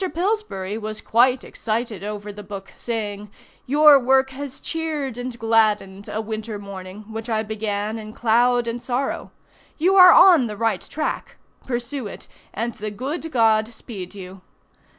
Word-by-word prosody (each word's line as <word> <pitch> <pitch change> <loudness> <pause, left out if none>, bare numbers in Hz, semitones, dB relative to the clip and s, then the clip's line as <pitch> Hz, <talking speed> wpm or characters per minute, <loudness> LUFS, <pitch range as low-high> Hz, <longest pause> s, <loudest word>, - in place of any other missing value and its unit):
Pillsbury 340 - -2
was 215 0 -4
quite 250 +3 +3
excited 220 -3 -3
over 210 0 -5
the 210 - -9
book, 195 -1 -9
saying; 210 -3 -4 0.4
"Your 295 +1 +7
work 265 +1 +3
has 275 0 -7
cheered 310 -6 -3
and 245 0 -5
gladdened 215 -3 +1
a 215 - -3
winter 220 0 -4
morning, 200 0 -9
which 225 +1 -5
I 220 -1 0
began 215 0 -3
in 215 0 -8
cloud 240 +2 +2
and 235 +1 -4
sorrow. 260 +3 -2 0.5
You 360 +5 +3
are 365 -2 +10
on 340 -11 +7
the 210 -1 -6
right 220 -4 0
track. 310 - -4 0.3
Pursue 245 0 -3
it, - - -10 0.2
and 230 +2 -3
the 215 0 -5
good 285 +10 -5
God 225 -2 +3
speed 205 -5 -9
you." 190 -1 -10
225 Hz, 150 wpm, -22 LUFS, 210-260 Hz, 0.5 s, are